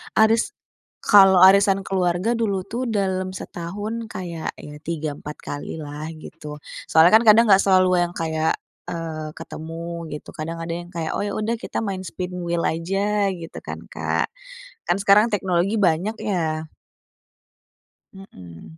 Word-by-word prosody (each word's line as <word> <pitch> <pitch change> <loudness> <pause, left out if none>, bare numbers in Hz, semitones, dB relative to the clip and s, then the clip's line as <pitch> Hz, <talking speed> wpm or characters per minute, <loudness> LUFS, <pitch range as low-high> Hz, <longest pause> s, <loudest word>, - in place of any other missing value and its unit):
Aris 220 +1 +3 0.5
kalau 195 -3 +7
arisan 195 +1 +6
keluarga 185 +4 +1
dulu 200 -5 -1
tuh 240 +5 -3
dalam 190 -4 -1
setahun 205 +6 -5
kayak 175 -5 -5
ya 150 - -9
3, 155 -3 -3
4 150 +1 -8
kalilah 150 +1 -6
gitu. 150 -1 -10 0.3
Soalnya 160 +2 +6
kan 225 - +6
kadang 220 +2 +8
nggak 195 0 +6
selalu 185 -2 +4
yang 175 0 -4
kayak, 160 -1 0 0.3
eee, 160 -2 -5
ketemu 165 +1 -7
gitu, 150 - -8
kadang 165 +2 -5
ada 165 0 -4
yang 175 +1 -6
kayak, 165 -2 -3
"Oh, - - -1
ya 205 - -2
udah 220 +2 -1
kita - - -4
main 195 -3 -3
spin 180 +1 -5
wheel 170 0 -1
aja," 195 +4 0
gitu 170 -3 -8
kan, - - -6
Kak, - - -1 0.6
kan 175 - +2
sekarang 205 +2 +6
teknologi 190 0 +1
banyak 180 +3 +2
ya. 160 -5 -1 1.5
Mhm. 95 - -13
180 Hz, 145 wpm, -23 LUFS, 160-200 Hz, 1.5 s, kadang